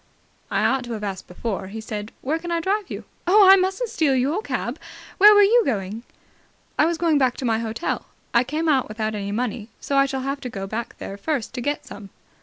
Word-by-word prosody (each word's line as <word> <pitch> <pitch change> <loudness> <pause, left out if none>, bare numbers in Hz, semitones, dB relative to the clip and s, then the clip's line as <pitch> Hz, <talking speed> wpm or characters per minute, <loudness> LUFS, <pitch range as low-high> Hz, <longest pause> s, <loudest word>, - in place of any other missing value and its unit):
"I - - +1
ought 265 -1 +2
to 240 - -5
have 215 -2 -5
asked 195 -2 -5
before," 190 +1 -4
he 215 +3 -7
said. 215 -1 -6
"Where 310 +5 -1
can 345 - -7
I 340 0 +1
drive 390 +4 -1
you?" - - -6 0.2
"Oh, 400 +2 +7
I 385 - +10
mustn't 385 +5 0
steal 290 -5 +2
your 280 +10 +1
cab. - - -3 0.4
Where 420 +2 +9
were 410 - +7
you 465 +4 +5
going?" 210 - -2 0.8
"I 305 - +5
was 340 0 -1
going 320 -3 +2
back 255 -2 +2
to 260 - -4
my 225 -2 +1
hotel. 225 +7 -3 0.3
I 235 - +5
came 310 +5 -2
out 275 -5 +3
without 215 0 -3
any 200 -1 -4
money, 225 0 -3
so 280 - -1
I 275 0 +5
shall 265 -1 -3
have 275 +1 -3
to 250 - -5
go 195 -4 -5
there 215 -1 -6
first 270 +1 -2
to 250 - -4
get 290 +4 -2
some." 200 -1 -10
260 Hz, 225 wpm, -23 LUFS, 220-330 Hz, 0.8 s, I